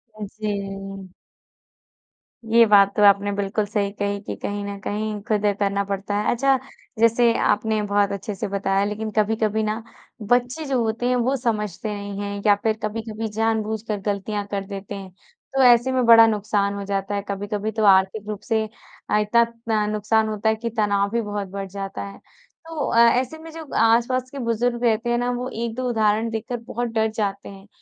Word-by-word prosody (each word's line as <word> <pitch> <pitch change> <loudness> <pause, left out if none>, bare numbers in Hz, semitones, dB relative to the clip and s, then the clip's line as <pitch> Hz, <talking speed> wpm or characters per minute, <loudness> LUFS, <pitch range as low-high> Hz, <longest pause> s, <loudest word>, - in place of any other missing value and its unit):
अ, 215 - -7
जी। 215 -1 -2 1.9
ये 230 +1 +6
बात 200 -2 +5
तो 210 - +3
आपने 200 0 +5
बिल्कुल 205 +1 -1
सही 205 -1 -1
कही 200 0 -2
कि - - -5
कहीं 205 0 -3
न 200 0 -5
कहीं 210 0 -3
खुद 210 -1 +1
ये 205 - +3
करना 200 0 0
पड़ता 200 +1 -3
है। 210 - +1
अच्छा 270 +2 +3 0.4
जैसे 230 +1 +4
आपने 215 0 +1
बहुत 205 0 +1
अच्छे-से 200 0 -4
बताया 195 0 0
लेकिन 215 +1 -4
कभी-कभी 215 0 +1
ना 215 +1 -2 0.4
बच्चे 245 +7 0
जो 265 -3 0
होते 225 +2 -2
हैं 250 - +2
वो 250 +3 +1
समझते 210 -3 -2
नहीं 200 0 -6
हैं 200 0 -4
या 205 - +6
फिर 220 -1 +1
कभी-कभी 220 +1 -3
जानबूझकर 220 -1 -1
गलतियाँ 205 0 -2
कर 195 -1 -2
देते 200 0 -7
हैं, 195 -1 -8
तो 270 - -4
ऐसे 245 +1 +5
में 255 -1 +1
बड़ा 230 -1 +8
नुकसान 205 -2 0
हो 200 - -4
जाता 200 0 -2
है। 200 - -1
कभी-कभी 205 +2 -3
तो 220 0 -2
आर्थिक 195 +2 +4
रूप 210 - -4
से 220 -3 0 0.5
अ, - - +3
इतना 235 +3 +4
तन 230 -2 -2
नुकसान 220 +1 +1
होता 215 +1 0
है 220 - +2
कि 230 +1 -4
तनाव 200 -1 +2
भी 235 +1 0
बहुत 205 -2 -4
बढ़ 195 +1 -6
जाता 195 0 -5
है। 200 - -10 0.5
तो 320 -3 -3
अ, 230 - +1 0.2
ऐसे 260 +5 -4
में 325 0 -11
जो 320 -1 -8
आस-पास 240 +3 +2
के 280 - -7
बुज़ुर्ग 240 0 -1
रहते 230 0 +1
हैं 240 - +2
ना 245 +1 0
वो 250 +1 -3
1-2 245 +2 -2
उदाहरण 220 0 +1
देखकर 225 +2 -4
बहुत 240 +1 -2
डर 220 0 +2
जाते 200 -2 -2
हैं 195 0 -13
215 Hz, 190 wpm, -23 LUFS, 200-230 Hz, 1.9 s, बड़ा